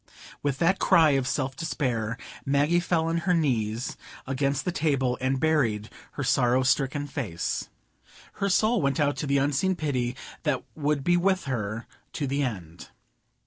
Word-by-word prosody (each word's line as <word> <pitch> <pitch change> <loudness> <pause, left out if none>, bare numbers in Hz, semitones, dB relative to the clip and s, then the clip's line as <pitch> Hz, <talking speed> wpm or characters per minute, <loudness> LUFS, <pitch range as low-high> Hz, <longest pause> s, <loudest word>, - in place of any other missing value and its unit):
With 140 -2 -1
that 180 +6 +2
cry 165 -5 +5
of 135 -2 +1
self 135 -1 -1
despair, 120 -8 -2 0.3
Maggie 145 +5 +2
fell 170 -2 +1
on 165 +1 0
her 180 +1 +1
knees 120 -6 0 0.3
against 135 +1 -1
the 180 - 0
table, 140 -7 +1
and 130 +1 +1
buried 125 -10 +1 0.2
her 140 - -3
sorrow 125 -1 +3
stricken 135 +2 +1
face. 110 - -3 0.7
Her 200 - +2
soul 215 +3 +3
went 140 +3 0
out 145 -1 +2
to 150 - -3
the 140 0 +2
Unseen 145 +7 +1
Pity 130 -7 -1 0.3
that - - 0
would 150 -2 -1
be 175 +3 +3
with 190 +1 +2
her 115 -4 -3 0.3
to 145 - -2
the 140 +1 -1
end. 90 - -5
140 Hz, 160 wpm, -27 LUFS, 125-160 Hz, 0.7 s, cry